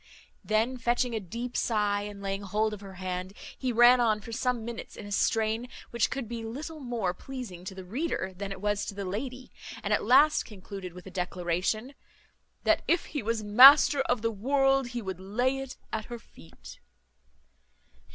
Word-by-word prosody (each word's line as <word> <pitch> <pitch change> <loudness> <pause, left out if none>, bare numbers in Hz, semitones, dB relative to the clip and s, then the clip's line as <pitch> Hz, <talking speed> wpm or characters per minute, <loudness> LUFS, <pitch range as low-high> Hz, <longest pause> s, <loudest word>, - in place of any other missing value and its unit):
Then 225 +4 +1
fetching 240 +1 +1
a 220 - -1
deep 235 +6 -6
sigh, 210 -3 +1
and 205 -1 -8
laying 195 0 -2
hold 210 +2 0
of 205 - -8
her 195 -2 -10
hand, 185 0 -4 0.2
he 260 -2 -2
ran 240 +2 +7
on 220 -3 +2
for 220 +2 -10
some 245 -1 -1
minutes 235 -1 -7
in - - -9
a 205 - -9
strain 220 +3 +1 0.2
which 235 -1 +1
would 270 -4 -4
be 230 0 -5
little 295 +8 -6
more 235 -9 -2
pleasing 225 -5 -8
to 190 - -6
the 190 - -8
reader 215 - -2
than 200 +1 -5
it 195 - -6
was 205 0 0
to 200 - -5
the 200 -1 -4
lady; 250 +7 -5 0.3
and - - 0
at - - +1
last 305 +1 +5
concluded 195 -3 -9
with 180 0 -11
a 190 - -9
declaration, 180 +7 -2 0.7
"That - - +3
if 340 - +2
he 290 - -1
was 225 0 -1
master 270 +7 +8
of 245 -3 +1
the 230 - +1
world, 270 +4 +2
he 240 -1 -5
would 190 -2 -5
lay 245 +8 0
it 270 -1 -7 0.2
at 215 -1 -2
her 240 - -7
feet." 80 - -15
220 Hz, 190 wpm, -28 LUFS, 195-250 Hz, 0.7 s, master